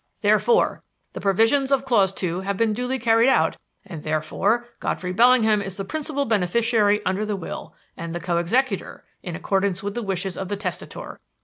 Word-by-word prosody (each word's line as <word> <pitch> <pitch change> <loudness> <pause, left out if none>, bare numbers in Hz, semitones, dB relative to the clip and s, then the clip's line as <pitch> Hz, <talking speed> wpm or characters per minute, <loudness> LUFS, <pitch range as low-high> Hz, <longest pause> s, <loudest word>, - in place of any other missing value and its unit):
Therefore 475 0 +2 0.3
the - - -6
provisions 225 +8 +2
of 270 -1 +2
clause 205 -7 +3
two 180 -2 -3
have 195 +1 -3
been 225 0 +2
duly 250 +4 -2
carried 230 +1 +4
out - - +2 0.3
and 170 -6 -8
therefore 190 +10 0
Godfrey 180 0 -3
Bellingham 225 -1 +4
is 195 -1 -6
the 195 - -4
principal 290 +2 -2
beneficiary 215 0 +2
under 190 +3 0
the 210 -1 -2
will, 185 - -7 0.2
and 165 0 -6
the - - -2
co 170 0 -1
executor, 220 +4 -1 0.2
in 175 -3 -6
accordance 195 +2 -1
with 205 0 -3
the 240 - -3
wishes 190 -2 -3
of 190 - -4
the 205 +1 -3
testator. 185 -4 -6
205 Hz, 180 wpm, -23 LUFS, 185-235 Hz, 0.3 s, carried